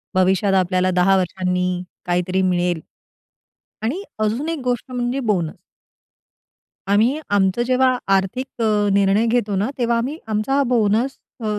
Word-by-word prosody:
भविष्यात 190 +1 +2
आपल्याला 185 0 +2
10 180 +2 +3
वर्षांनी 180 0 -1 0.2
काहीतरी 180 +1 0
मिळेल. 175 -3 0 1.0
आणि 270 - -2 0.2
अजून 225 +8 -1
एक 330 -1 -2
गोष्ट 245 0 -2
म्हणजे 245 +2 -1
बोनस. 190 -10 -1 1.4
आम्ही 235 +9 +3
आमचं 200 +3 +2
जेव्हा 255 0 +3 0.2
आर्थिक 195 +7 -1 0.2
अ, 210 -2 +2
निर्णय 200 +3 +3
घेतो 225 -4 0
ना 205 +6 0
तेव्हा 235 -1 +1
आम्ही 270 +7 -3
आमचा 220 +6 +1
बोनस 230 +3 +1 0.2
अ, 215 -2 -2
210 Hz, 130 wpm, -20 LUFS, 185-245 Hz, 1.4 s, 10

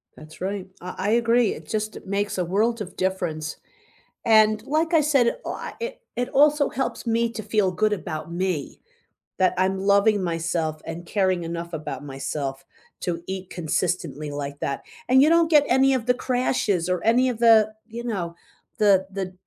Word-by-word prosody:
That's 155 0 -13
right. 195 0 -3
I 180 +1 -7
I 195 +2 -1
agree. 235 0 +3
It - - -11
just 215 0 -3
makes 200 +1 -1
a 180 - 0
world 215 +6 +1
of 190 - -7
difference, 170 -5 -2 0.7
and 215 -1 +5
like 320 +4 0
I 320 - +6
said, 280 - +2
I - - -5
it - - -5
it 245 +1 -1
also 290 +1 +4
helps 265 - -3
me 230 +1 +2
to 220 -1 -5
feel 205 -2 +1
good 215 +4 +1
about 155 -4 -5
me, 175 -4 -2 0.6
that 185 -1 +3
I'm 190 +1 +1
loving 200 +1 +3
myself 165 -2 -2
and 170 +1 -6
caring 185 -3 +1
enough 170 +1 -5
about 150 -2 -5
myself 135 0 -4 0.4
to 170 -1 -3
eat 190 -1 -5
consistently 160 -3 -2
like 145 0 -5
that 140 - -3 0.3
and 260 +2 +6
you 295 - +5
don't 335 0 +4
get 295 - +7
any 265 +2 +4
of 250 -2 -2
the 250 - +5
crashes 245 -8 0
or 180 -1 0
any 245 +4 +4
of 240 -3 -2
the 220 -2 +5
you 230 +1 -7
know, 185 -8 -3 0.4
the 195 -3 +4
the 190 -1 -4
200 Hz, 175 wpm, -24 LUFS, 170-235 Hz, 0.7 s, get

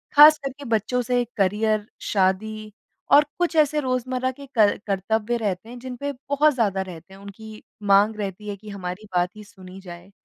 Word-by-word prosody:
ख़ास 300 +1 +9
करके 275 0 -7
बच्चों 230 +2 0
से 245 0 +1
करियर 210 +2 +1
शादी 215 +2 -1 0.4
और 295 +1 +7
कुछ 350 -2 0
ऐसे 305 -1 +3
रोजमर्रा 255 -1 -1
के 280 +2 -12
कर 210 -2 +4
कर्तव्य 215 +4 0
रहते 210 0 -3
हैं 245 - -9
जिनपे 260 +3 -5 0.2
बहुत 295 +2 +4
ज़्यादा 205 -6 0
रहते 180 0 -9
हैं। 195 - -13
उनकी 215 +2 -11 0.3
माँग 210 +2 +4
रहती 205 0 -5
है 200 - -3
कि 210 +1 -12
हमारी 195 +1 -6
बात 175 0 +2
ही 210 - -10
सुनी 190 -2 -13
जाए। 175 +1 -11
215 Hz, 175 wpm, -23 LUFS, 195-255 Hz, 0.4 s, ख़ास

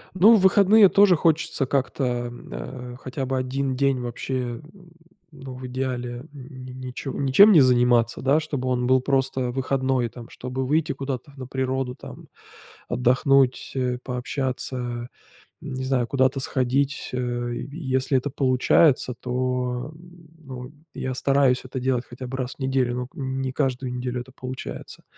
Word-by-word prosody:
Ну, 210 +5 +7
в - - +4
выходные 200 +2 +6
тоже 200 -2 +6
хочется 160 -3 +1
как-то, 135 +1 -1
м, 120 -1 -3
а, 120 - -7
хотя 130 +1 -4
бы 130 +1 -1
1 130 +1 -1
день 135 0 +1
вообще, 120 0 -4 0.7
ну, 135 -3 -9
в 130 0 -7
идеале, 125 -1 -4
ни 130 -2 -10
ничем 135 +8 +3
не 165 -7 +8
заниматься, 120 -2 +3
да. 140 +4 +3
Чтобы 140 -4 -4
он 125 -1 0
был 130 0 +4
просто 130 -2 0
выходной 130 -1 0
там, 115 +1 -11
чтобы 130 +1 -4
выйти 155 +4 +1
куда-то 135 0 -5
на 130 - -6
природу 130 0 -2
там, - - -11 0.6
отдохнуть, 130 +2 +2 0.3
пообщаться, 125 -1 -3 0.5
не 130 0 -5
знаю 130 -2 0
куда-то 130 +1 +2
сходить, 135 +2 0
э, 120 -1 -2 0.2
если 130 -3 0
это 130 +3 -2
получается, 130 0 +3
то, 125 +1 -2 0.5
ну, 130 -4 -9 0.2
я 130 - -3
стараюсь 135 -1 +2
это 130 0 -5
делать 125 -1 0
хотя 125 +1 -8
бы 130 +1 -5
раз 130 0 -3
в - - -38
неделю, 130 -2 0
но 125 0 -3
к - - -37
не 130 -1 -3
каждую 130 -2 -1
неделю 125 0 -3
это 130 - -12
получается. 130 0 -8
130 Hz, 145 wpm, -24 LUFS, 125-135 Hz, 0.7 s, не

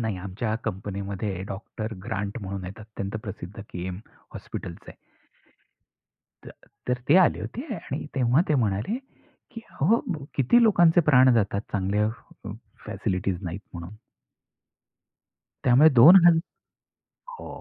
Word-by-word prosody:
नाही, 110 -4 -2
आमच्या 100 +4 -3
कंपनीमध्ये 100 0 -4
डॉक्टर 110 +2 -6
ग्रांट 105 -1 -4
म्हणून 95 -1 -5
येतात. 95 +4 -9
अत्यंत 105 -1 -6
प्रसिद्ध 95 -1 -8
KEM 90 -2 -6 0.4
हॉस्पिटलचं - - -8
आहे. - - -15 1.5
तर - - -9 0.4
तर 125 0 0
ते 150 - +6
आले - - 0
होते 245 - -6
आणि 150 -5 -6
तेव्हा 130 +1 +3
ते 155 - +2
म्हणाले, 110 - 0 0.5
की 230 - -9 0.2
"अहो, 210 +12 +3 0.3
किती 145 - +4
लोकांचे 175 -6 +5
प्राण 130 -2 +6
जातात, 100 -3 +1
चांगल्या, 105 +1 0 0.4
अ, - - -6 0.4
फॅसिलिटीज 90 0 -2
नाहीत 90 +1 -5
म्हणून." 85 +3 -8 1.7
त्यामुळे 130 +5 +6
दोन 140 +10 +9
हज 170 -2 +6 1.0
हो - - -10
105 Hz, 125 wpm, -25 LUFS, 95-130 Hz, 1.7 s, दोन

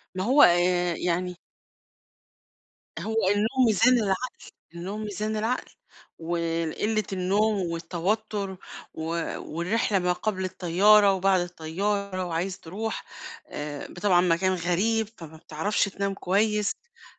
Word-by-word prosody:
ما 185 - -1
هو 265 +6 +5
آآ، 175 0 +4
يعني 180 +1 -1 1.6
هو 220 0 0
النوم 225 +6 +2
ميزان 230 +4 +4
العقل. 215 +3 -1 0.4
النوم 195 +5 -5
ميزان 215 +1 -3
العقل، 225 +4 -2 0.5
والقلة 170 +5 -1
النوم 200 +4 +1
والتوتر 190 +4 -2 0.4
و - - -8 0.4
والرحلة 190 +5 -1
ما 180 0 +1
قبل 190 0 -2
الطيارة 195 +3 +4
وبعد 190 -1 +3
الطيارة 185 +3 -2
وعايز 180 +2 -3
تروح 215 +7 -5 0.4
آآ، 145 -1 -6
ب - - -12
طبعًا 180 -2 +4
مكان 185 +2 +2
غريب 200 +6 0
فما 160 -1 -10
بتعرفش 160 +6 -1
تنام 200 0 -2
كويس 210 +3 +1
أ 475 0 -26
190 Hz, 115 wpm, -26 LUFS, 175-215 Hz, 1.6 s, هو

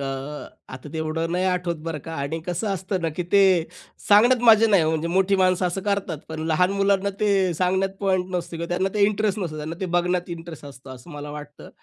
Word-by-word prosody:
अ, - - -3 0.7
आता 130 +3 -10
तेवढं 160 +1 -2
नाही 180 +1 0
आठवत 180 -2 0
बरं 160 -2 -3
का 165 - -7
आणि 140 +3 -3
कसं 180 +4 -2
असतं 190 0 -3
ना 165 - +1
की 180 - -1
ते 200 - +6 0.7
सांगण्यात 235 +4 +5
मजा 225 0 +7
नाही 195 -5 +5
हो, 155 - +1
म्हणजे 160 +1 -1
मोठी 190 +2 +2
माणसं 185 -1 +2
असं 180 +2 -2
करतात, 195 -6 -1
पण 160 0 -6
लहान 180 +4 +2
मुलांना 200 0 +1
ते 210 - +2 0.3
सांगण्यात 190 +3 +1
पॉइंट 190 -2 +1
नसतो 175 -1 -3
किंवा 170 - -4
त्यांना 185 +2 0
ते 210 - 0
इंटरेस्ट 210 0 0
नसतो. 170 -6 -4
त्यांना 155 +2 -5
ते 190 - -1
बघण्यात 180 0 0
इंटरेस्ट 165 -3 -10
असतो, 135 -1 -12
असं 130 +5 -11
मला 145 -1 -7
वाटतं. 145 0 -10
180 Hz, 215 wpm, -23 LUFS, 160-195 Hz, 0.7 s, मजा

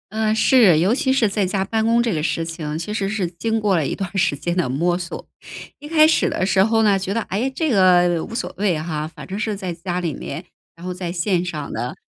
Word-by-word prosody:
嗯， 215 0 0
是， 220 -8 +5
尤 185 +7 +3
其 265 +1 +1
是 235 -5 +2
在 200 -1 0
家 190 +1 -1
办 220 +3 -1
公 235 +1 +3
这 230 -4 0
个 155 - -1
事 165 +1 -1
情， 160 -2 -5
其 170 +6 -5
实 200 -2 -1
是 200 -3 -1
经 220 +6 -2
过 200 -3 +2
了 150 -4 0
一 - - -3
段 195 -3 -4
儿 - - -4
时 180 -6 +2
间 170 +5 -3
的 175 - +1
摸 170 +7 0
索。 175 -1 -7 0.5
一 295 - -10
开 310 0 +5
始 315 - +3
的 - - -1
时 190 0 +3
候 225 0 +2
呢， 200 -2 +3
觉 190 +1 -3
得， 230 - 0
哎， 220 +6 -2
这 300 +3 -1
个 180 -4 +4
无 230 - -8
所 235 - -3
谓 195 -4 +1
哈， 155 -1 -3
反 165 - -11
正 195 +2 -5
是 215 -1 -2
在 185 -3 -5
家 175 +1 -4
里 165 -4 -2
面， - - -6 0.3
然 170 +2 -12
后 180 - -3
在 180 -1 -5
线 180 0 0
上 155 -5 -5
的。 120 +3 -4
190 Hz, 280 characters per minute, -21 LUFS, 170-220 Hz, 0.5 s, 是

